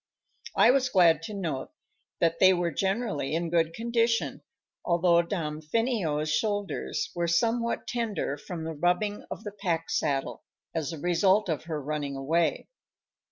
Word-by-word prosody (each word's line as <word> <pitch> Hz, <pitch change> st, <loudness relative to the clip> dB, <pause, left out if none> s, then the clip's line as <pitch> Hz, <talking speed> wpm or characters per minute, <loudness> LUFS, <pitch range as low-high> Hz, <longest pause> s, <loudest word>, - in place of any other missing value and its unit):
I -, -, +6 dB
was 260 Hz, -1 st, +2 dB
glad 170 Hz, -7 st, +5 dB
to 215 Hz, -, -6 dB
note 165 Hz, -9 st, -3 dB, 0.5 s
that 165 Hz, -1 st, +2 dB
they 185 Hz, 0 st, +7 dB
were 175 Hz, -1 st, 0 dB
generally 190 Hz, -, -1 dB
in 165 Hz, 0 st, -2 dB
good 165 Hz, -1 st, +2 dB
condition, 230 Hz, 0 st, 0 dB, 0.4 s
although 170 Hz, 0 st, +4 dB
Damfino's 160 Hz, -, -1 dB
shoulders 205 Hz, +2 st, -1 dB
were 175 Hz, -1 st, -1 dB
somewhat 230 Hz, +7 st, +1 dB
tender 225 Hz, -, -2 dB
from 160 Hz, +3 st, -7 dB
the 160 Hz, 0 st, -4 dB
rubbing 180 Hz, +6 st, 0 dB
of -, -, -7 dB
the 205 Hz, -, -5 dB
pack 175 Hz, -5 st, -2 dB
saddle, 140 Hz, -3 st, -1 dB, 0.3 s
as 160 Hz, -4 st, -2 dB
the 165 Hz, -, -5 dB
result 185 Hz, +5 st, +2 dB
of 160 Hz, -1 st, -2 dB
her 160 Hz, -2 st, -3 dB
running 145 Hz, -1 st, -3 dB
away. 160 Hz, +5 st, 0 dB
170 Hz, 145 wpm, -28 LUFS, 160-210 Hz, 0.5 s, they